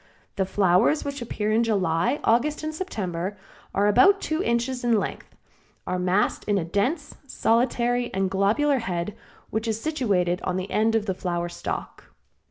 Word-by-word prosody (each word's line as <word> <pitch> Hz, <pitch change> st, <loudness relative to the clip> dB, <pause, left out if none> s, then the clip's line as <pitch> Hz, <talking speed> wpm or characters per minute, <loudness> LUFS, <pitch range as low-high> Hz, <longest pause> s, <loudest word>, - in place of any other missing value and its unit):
The 190 Hz, -1 st, 0 dB
flowers 195 Hz, -, +3 dB
which 280 Hz, -1 st, -4 dB
appear 215 Hz, -2 st, -2 dB
in 225 Hz, +2 st, +3 dB
July, 185 Hz, -, +1 dB
August 270 Hz, +7 st, +2 dB
and 310 Hz, 0 st, -3 dB
September 190 Hz, -, -3 dB
and 205 Hz, -, -7 dB, 0.4 s
are 200 Hz, -, +3 dB
about 390 Hz, -, +5 dB
two 315 Hz, -1 st, -1 dB
inches 245 Hz, -2 st, -1 dB
in 235 Hz, -2 st, +3 dB
length, -, -, -6 dB, 0.5 s
are 180 Hz, 0 st, -2 dB
massed 185 Hz, +3 st, +1 dB
in 205 Hz, -1 st, +1 dB
a 175 Hz, -, -1 dB
dense, 255 Hz, -, -1 dB
solitary 240 Hz, 0 st, +1 dB
and 190 Hz, 0 st, 0 dB
globular 215 Hz, +10 st, +2 dB
head, 190 Hz, -2 st, -3 dB, 0.4 s
which 220 Hz, +2 st, -2 dB
is 220 Hz, -1 st, -1 dB
situated 200 Hz, -, 0 dB
at 185 Hz, 0 st, -1 dB
the 185 Hz, +1 st, -4 dB
end 220 Hz, +1 st, +2 dB
of 220 Hz, -2 st, +1 dB
the 190 Hz, -, -1 dB
flower 175 Hz, -2 st, -3 dB
stalk. 175 Hz, -, -6 dB
215 Hz, 170 wpm, -25 LUFS, 185-245 Hz, 0.5 s, about